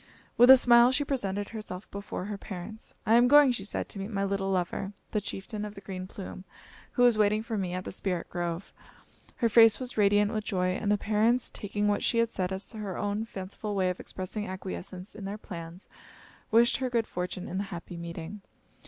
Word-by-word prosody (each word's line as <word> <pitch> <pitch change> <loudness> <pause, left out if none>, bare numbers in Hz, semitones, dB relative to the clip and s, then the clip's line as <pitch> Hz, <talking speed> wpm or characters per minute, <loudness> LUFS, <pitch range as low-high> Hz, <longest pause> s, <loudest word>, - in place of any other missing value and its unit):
With 245 +2 +7
a 265 - +12
smile, 240 0 +6
she 290 +2 +1
presented 205 -7 -2
herself 215 -4 -7
before 200 -2 -5
her 205 0 -4
parents. 205 +3 -8
"I 220 - +3
am 240 +1 +6
going," 290 0 +7
she 235 -5 -3
said, 205 - -3
"to 200 - -7
meet 195 +2 -4
my 200 -3 -1
little 195 0 -1
lover, 190 +1 -1 0.2
the 210 - 0
Chieftain 205 +2 -5
of 210 0 -6
the 195 - -10
Green 185 -1 -6
Plume, 190 -1 -8 0.5
who 245 - +4
is 235 -3 +4
waiting 210 +1 +3
for 230 -1 -4
me 185 -3 -2
at 185 0 -4
the - - -5
Spirit 185 -2 -3
Grove." 175 +1 -4 0.6
Her 235 - +2
face 225 0 +6
was 255 -3 -5
radiant 205 +1 +4
with 215 -1 -1
joy, 185 -3 0
and 200 +3 -1
the 210 - +4
parents, 220 +4 +1
taking 205 0 -2
what 205 - +1
she 235 - +1
had 230 0 +2
said 185 -1 -2
as 190 +1 -5
her 210 -4 -5
own 205 +2 -1
fanciful 200 0 -6
way 185 -2 +2
of 180 - -7
expressing 200 +3 -5
acquiescence 185 0 -6
in 205 - -8
their 200 +2 -4
plans, 170 -3 -9 0.6
wished 235 +2 +4
her 255 -1 -2
good 235 -2 +1
fortune 180 -1 -4
in 190 - -3
the 200 - -2
happy 175 -2 -8
meeting. 170 +3 -7
205 Hz, 215 wpm, -29 LUFS, 185-225 Hz, 0.6 s, a